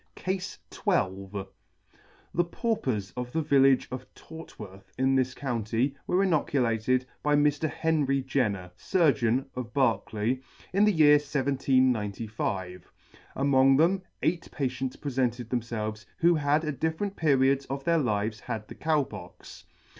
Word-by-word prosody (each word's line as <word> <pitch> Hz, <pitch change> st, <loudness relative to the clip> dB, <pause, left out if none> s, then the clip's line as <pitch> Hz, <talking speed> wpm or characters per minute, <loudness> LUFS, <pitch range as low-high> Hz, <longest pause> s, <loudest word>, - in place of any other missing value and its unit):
CASE 185 Hz, 0 st, -3 dB, 0.2 s
XII: 95 Hz, +1 st, -1 dB, 0.9 s
THE 175 Hz, -, +3 dB
Paupers 170 Hz, -, -2 dB
of 125 Hz, 0 st, -4 dB
the 160 Hz, -, 0 dB
village 135 Hz, -3 st, +4 dB
of 130 Hz, 0 st, -7 dB
Tort 160 Hz, 0 st, -12 dB
worth, 95 Hz, -2 st, -11 dB
in 130 Hz, +1 st, +2 dB
this 130 Hz, -1 st, +1 dB
County, 120 Hz, +1 st, -1 dB
were 185 Hz, +2 st, +2 dB
inoculated 130 Hz, -, +1 dB, 0.2 s
by 150 Hz, 0 st, +2 dB
Mr. 145 Hz, +1 st, +2 dB
Henry 145 Hz, -5 st, 0 dB
Jenner, 105 Hz, -9 st, -1 dB
Surgeon, 130 Hz, -, +2 dB
of 120 Hz, -3 st, -6 dB
Berkeley, 120 Hz, -2 st, 0 dB, 0.3 s
in 200 Hz, +2 st, +4 dB
the 210 Hz, -, +4 dB
year 150 Hz, -4 st, +6 dB
1795. 115 Hz, -, -1 dB, 0.4 s
Among 135 Hz, -1 st, +4 dB
them, 180 Hz, +5 st, +3 dB, 0.2 s
eight 170 Hz, +1 st, 0 dB
patients 130 Hz, -1 st, -3 dB
prefented 125 Hz, -4 st, -2 dB
them 125 Hz, -1 st, +1 dB
felves 110 Hz, -2 st, -5 dB
who 170 Hz, +1 st, +4 dB
had 150 Hz, 0 st, +1 dB
at 150 Hz, -4 st, -4 dB
different 160 Hz, +6 st, -1 dB
periods 140 Hz, -2 st, +2 dB
of 135 Hz, 0 st, -4 dB
their 170 Hz, +1 st, +2 dB
lives 110 Hz, -4 st, -1 dB
had 110 Hz, -3 st, -5 dB
the -, -, -9 dB
Cow 155 Hz, -2 st, +1 dB
Pox. -, -, -11 dB
130 Hz, 135 wpm, -28 LUFS, 115-150 Hz, 0.9 s, year